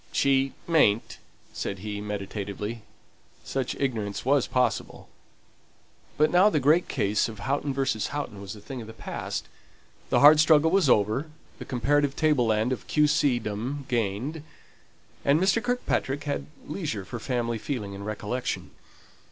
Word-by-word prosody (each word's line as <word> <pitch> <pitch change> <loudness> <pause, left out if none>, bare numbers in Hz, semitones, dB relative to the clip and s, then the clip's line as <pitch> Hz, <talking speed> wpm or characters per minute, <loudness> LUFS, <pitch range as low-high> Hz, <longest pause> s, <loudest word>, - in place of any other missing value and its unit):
"She 135 -1 +2
mayn't," 135 -10 +2 0.3
said 100 - -4
he, 105 -1 -4
meditatively 105 +2 -5 0.6
such 135 -2 -2
ignorance 110 -7 -2
was 140 -1 +3
possible. 125 -1 -1 1.1
But 155 +1 +3
now 185 +4 +6
the 155 - +1
great 155 +6 +3
case 100 +3 0
of 110 - -9
Houghton 140 +7 -1
v. 135 0 0 0.3
Houghton 130 -9 -5
was 100 +1 -7
a - - -11
thing 130 +3 -7
of 110 - -9
the 110 - -9
past; - - -5 0.6
the - - +3
hard 150 +2 +9
struggle 160 0 +5
was 190 -7 +3
over, 110 +8 +2 0.3
the - - -7
comparative 140 +3 +1
table 150 -7 +2
land 110 +3 +1
of 130 - -4
Q. 150 -1 +3
C. 145 -4 +3
dom 120 +6 -4
gained, 120 +6 -1 0.8
and 140 +2 +4
Mr. 190 +5 +3
Kirkpatrick 245 - -1
had 145 -1 -3 0.2
leisure 150 - -4
for 120 +5 -6
family 120 -2 -2
feeling 105 -6 -4
and 100 0 -7
recollection. 110 +4 -3
130 Hz, 150 wpm, -26 LUFS, 105-145 Hz, 1.1 s, hard